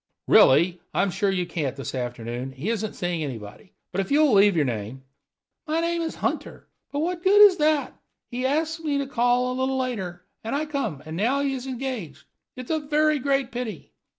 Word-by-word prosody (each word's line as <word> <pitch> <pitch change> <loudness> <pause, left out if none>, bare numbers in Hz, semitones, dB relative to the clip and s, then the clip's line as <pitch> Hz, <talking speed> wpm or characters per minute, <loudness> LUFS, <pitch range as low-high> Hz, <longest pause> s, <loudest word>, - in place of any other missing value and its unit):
"Really, 170 +6 +5
I'm 195 0 +2
sure 195 +2 0
you 185 -2 0
can't 145 -7 -3
this 135 - -6
afternoon; 120 0 -4
he 150 +12 -3
isn't 215 -2 -3
seeing 175 -3 -2
anybody. 120 - -8 0.2
But 195 - 0
if 190 - -6
you'll 295 -2 +4
leave 200 -1 +5
your 155 -3 +2
name 120 +2 -4 0.3
" - - -51
"My 315 +2 0
name 335 0 0
is 325 - -3
Hunter; - - -4 0.2
but 285 - -2
what 345 +2 -1
the 375 - +1
good 415 0 +9
of 365 - -8
that? 300 -1 +2 0.4
He 245 +1 -3
ask 320 +4 0
me 290 -2 0
to 280 - -1
call 245 -1 +1
a 255 - -3
little 265 0 0
later, 195 -9 -4 0.2
and 225 +4 -2
I 300 +2 -1
come, 225 - -3
and 160 +1 -6
now 245 +10 +1
he 280 -1 0
is 260 0 -5
engaged. 250 - -5 0.3
It 255 - -6
is - - -6
a 315 - +1
very 305 0 +2
great 275 -1 0
pity." 235 -8 -6
245 Hz, 210 wpm, -25 LUFS, 175-285 Hz, 0.4 s, good